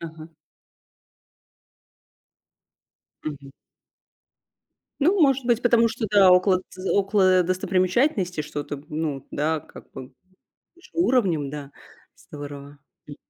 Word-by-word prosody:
Ага. 160 -1 -9 3.0
Мгм. 140 -2 -7 1.5
Ну, 370 +7 +3
может 270 -4 +3
быть, 240 -1 +2
потому 235 -2 +4
что, 230 0 -4
да, 200 -2 +6
около 185 0 +4
тз 185 0 -9
около 195 -2 +3
достопримечательностей 185 - 0
что-то, 145 -1 -6
ну 150 -3 -4
да, 155 +1 -1
как - - -15
бы 130 0 -10 0.6
выше 345 - -20
уровнем, 195 - +1
да, 145 -1 -8 0.4
здорово, 145 -1 -10 0.3
м. 145 - -10
180 Hz, 100 wpm, -24 LUFS, 145-210 Hz, 3.0 s, да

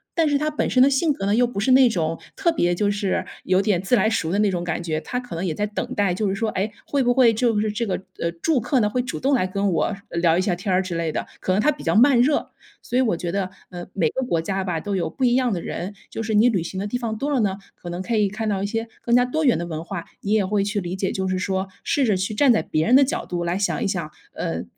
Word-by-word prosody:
但 330 -2 +3
是 290 - +3
他 305 +2 0
本 300 - -1
身 255 - +3
的 270 - +7
性 295 +3 +2
格 195 - -5
呢， 205 - +3
又 245 +2 +4
不 235 -4 -5
是 220 +6 +2
那 260 0 +7
种 165 -6 -1 0.2
特 360 -4 +2
别 175 - +1
就 205 +3 +1
是 200 -2 -1 0.2
有 185 +1 +2
点 200 -4 +1
自 195 +6 +2
来 220 -1 +3
熟 165 -7 -1
的 200 - +1
那 210 -1 +3
种 175 -2 -2
感 175 -1 -2
觉， 160 -2 -2
他 250 - -3
可 245 -7 -8
能 170 +3 -3
也 170 - -1
在 210 - -1
等 210 - -4
待， 200 -3 +2
就 205 +3 -1
是 - - 0
说， 220 +2 -1
哎， 200 +3 -2
会 280 -2 0
不 245 0 +3
会 245 -3 +5
就 225 -1 +1
是 215 0 0
这 230 +3 -2
个， 195 - -1 0.2
呃 170 - -1
住 260 - 0
客 255 +4 +1
呢， 210 -2 +2
会 250 +4 0
主 250 - -5
动 275 +2 +1
来 245 -8 +2
跟 195 +1 0
我 175 +4 0
聊 170 -1 +2
一 - - +2
下 185 -2 0
天 190 +2 -2
儿 185 - +3
之 185 -2 -5
类 165 -1 -1
的， - - -3
可 - - -2
能 200 - +2
他 300 - +4
比 290 - -9
较 - - +1
慢 250 +3 +6
热。 285 +4 +1 0.3
所 245 - -2
以 - - +4
我 225 -8 +1
觉 170 0 -3
得， 195 0 -1 0.2
呃 175 -1 -8
每 165 -6 +1
个 265 - -3
国 170 -9 0
家 190 +3 -2
吧 180 -3 -2
都 200 +4 -3
有 185 - -1
不 265 - -5
一 245 -1 +4
样 255 -2 +2
的 175 - -2
人， 185 +4 -5 0.2
就 - - -5
是 220 0 -2
你 215 +4 +5
旅 200 -7 0
行 185 +3 -5
的 200 - -2
地 245 - -2
方 230 -3 -3
多 280 +6 -2
了 275 - +2
呢， 195 -2 0 0.2
可 175 - -9
能 175 +1 -4
可 230 +5 -2
以 205 -2 +2
看 220 +2 -4
到 195 -2 -1
一 - - 0
些 225 +2 -2
更 235 - +2
加 245 0 +5
多 310 +6 -1
元 250 - +4
的 170 - -3
文 160 -2 -5
化， 175 -1 -6 0.2
你 200 - -3
也 215 -3 +3
会 200 +1 +1
去 205 +1 -1
理 175 0 -4
解， 190 0 -1
就 190 -1 -2
是 185 0 -1
说 190 0 -1 0.2
试 280 - +1
着 215 -4 +2
去 190 +3 -2
站 265 +5 +4
在 220 - +2
别 155 +1 0
人 245 - +5
的 275 - +7
角 270 - -2
度 175 -1 -3
来 170 +1 -1
想 180 -6 0
一 - - +1
想， 170 -6 -3 0.2
呃 80 +1 -3
205 Hz, 335 characters per minute, -23 LUFS, 180-245 Hz, 0.3 s, 的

